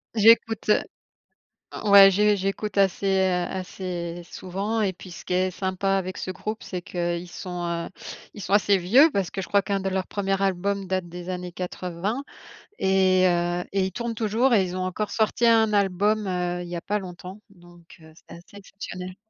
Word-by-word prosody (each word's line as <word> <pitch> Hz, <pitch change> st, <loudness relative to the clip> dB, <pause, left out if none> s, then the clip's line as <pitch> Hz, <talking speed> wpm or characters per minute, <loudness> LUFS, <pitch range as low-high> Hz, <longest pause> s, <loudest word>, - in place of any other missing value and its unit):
J'écoute 225 Hz, 0 st, +4 dB
heu, -, -, +5 dB, 1.0 s
o 210 Hz, -, -2 dB
ouais 195 Hz, -1 st, +10 dB
j'é 210 Hz, +2 st, +3 dB
j'écoute 195 Hz, +2 st, -3 dB
assez, 195 Hz, 0 st, +2 dB
heu, 190 Hz, -1 st, +2 dB, 0.2 s
assez 180 Hz, -2 st, -5 dB
souvent 200 Hz, +6 st, -4 dB
et 195 Hz, -3 st, +1 dB
puis 180 Hz, 0 st, -12 dB
ce -, -, -10 dB
qui -, -, -5 dB
est 185 Hz, 0 st, +1 dB
sympa 190 Hz, +1 st, -2 dB
avec 185 Hz, -1 st, -3 dB
ce 185 Hz, -, -4 dB
groupe, 215 Hz, +4 st, -6 dB
c'est 180 Hz, -2 st, -5 dB
qu'ils 175 Hz, 0 st, -3 dB
sont, 180 Hz, -1 st, -6 dB
heu, 170 Hz, 0 st, -3 dB, 0.5 s
ils 205 Hz, -, -9 dB
sont 190 Hz, -, -5 dB
assez 205 Hz, -1 st, +4 dB
vieux 230 Hz, -, +5 dB
parce 195 Hz, -3 st, -1 dB
que 195 Hz, -, -4 dB
je -, -, -5 dB
crois 200 Hz, -1 st, +2 dB
qu'un 195 Hz, 0 st, -1 dB
de 190 Hz, -, -2 dB
leur 190 Hz, -1 st, -2 dB
premier 195 Hz, -1 st, -1 dB
album 195 Hz, +1 st, -1 dB
date 185 Hz, -1 st, -2 dB
des 175 Hz, +1 st, -9 dB
années 180 Hz, -1 st, -5 dB
80 180 Hz, +7 st, -4 dB, 0.5 s
et 190 Hz, -1 st, +3 dB
heu 175 Hz, 0 st, 0 dB
et 195 Hz, -, +2 dB
ils -, -, -6 dB
tournent 235 Hz, +3 st, -4 dB
toujours 230 Hz, +3 st, +1 dB
et 205 Hz, -4 st, +5 dB
ils 180 Hz, 0 st, -4 dB
ont 185 Hz, -, -2 dB
encore 200 Hz, +3 st, -3 dB
sorti 220 Hz, +2 st, +1 dB
un 225 Hz, -2 st, +4 dB
album, 205 Hz, +2 st, +1 dB
heu, 180 Hz, -1 st, -2 dB
il 175 Hz, -, -9 dB
y 175 Hz, -, -4 dB
a 170 Hz, -, -6 dB
pas 210 Hz, -, -1 dB
longtemps, 185 Hz, +1 st, -10 dB
donc, 175 Hz, -3 st, -18 dB
heu, 160 Hz, 0 st, -16 dB
c'est -, -, -16 dB
assez 175 Hz, +4 st, -18 dB
exceptionnel. 185 Hz, -2 st, -8 dB
190 Hz, 200 wpm, -25 LUFS, 180-205 Hz, 1.0 s, ouais